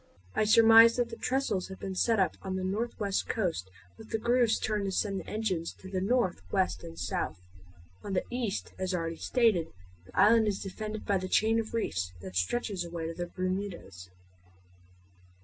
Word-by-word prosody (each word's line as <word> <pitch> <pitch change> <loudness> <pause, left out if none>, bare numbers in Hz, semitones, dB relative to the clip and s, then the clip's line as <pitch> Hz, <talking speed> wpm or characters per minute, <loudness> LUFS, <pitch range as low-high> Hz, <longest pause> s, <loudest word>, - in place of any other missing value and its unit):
I 215 - +2
surmise 225 +1 +8
that 245 -1 0
the 230 - -6
trestles 240 -8 -1
have 190 - -9
been 195 - -4
set 225 +4 +2
up 190 -2 +2
on 190 -1 -4
the 190 - -2
northwest 205 0 -2
coast 170 - -1 0.3
with 220 - -12
the - - 0
grooves 240 0 +3
turned 210 -2 -1
to 195 - -1
send 195 0 -1
the - - -10
engines 195 -6 -2
to 190 - -12
the 185 -1 -1
north, 195 - +1
west, 85 +2 0
and 85 0 -9
south. 90 +1 -2 0.7
On 200 - -4
the 185 - +1
east, 240 -5 -3
as 185 0 -1
already 165 -1 -3
stated, 220 -10 +2 0.4
the - - -4
island 220 +3 +6
is 200 -2 0
defended 215 +2 -6
by 200 -2 +1
the 185 0 -5
chain 225 +3 +3
of 225 0 -4
reefs 95 - -2
that 95 0 -9
stretches 185 - -1
away 170 -1 -5
to 165 - -3
the 175 +1 -4
Bermudas. 185 - -4
195 Hz, 185 wpm, -30 LUFS, 175-225 Hz, 0.7 s, surmise